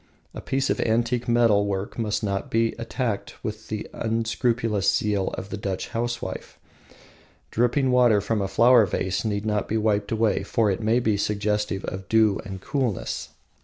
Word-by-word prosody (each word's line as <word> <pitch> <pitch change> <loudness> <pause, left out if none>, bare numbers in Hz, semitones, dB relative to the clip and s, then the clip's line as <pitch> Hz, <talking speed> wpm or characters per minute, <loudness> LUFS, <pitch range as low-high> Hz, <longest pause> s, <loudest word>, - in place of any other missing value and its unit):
A - - -7
piece 135 0 0
of - - -1
antique 120 +2 0
metal 115 -4 +3
work 100 +3 -3
must 110 -2 -1
not 100 -1 -2
be 115 0 +1
attacked 115 -2 -3
with 110 0 -5
the 110 -1 -4
unscrupulous 115 -2 0
zeal 105 -3 0
of 95 - -6
the 110 - -3
Dutch 100 -2 -4
housewife. 115 -4 -4 0.9
Dripping 125 +3 +2
water 120 -4 +5
from 105 +1 -1
a 100 - 0
flower 115 +2 +5
vase 95 +1 -1
need 105 -1 -2
not 105 -2 0
be 110 - 0
wiped 105 -2 0
away, 110 -1 +1
for 110 -4 +1
it 95 - -3
may 110 +3 +2
be 110 -4 +1
suggestive 105 -1 -1
of 95 0 -6
dew 110 -3 +4
and 95 -1 -7
coolness. 125 -6 -2
110 Hz, 165 wpm, -25 LUFS, 100-115 Hz, 0.9 s, water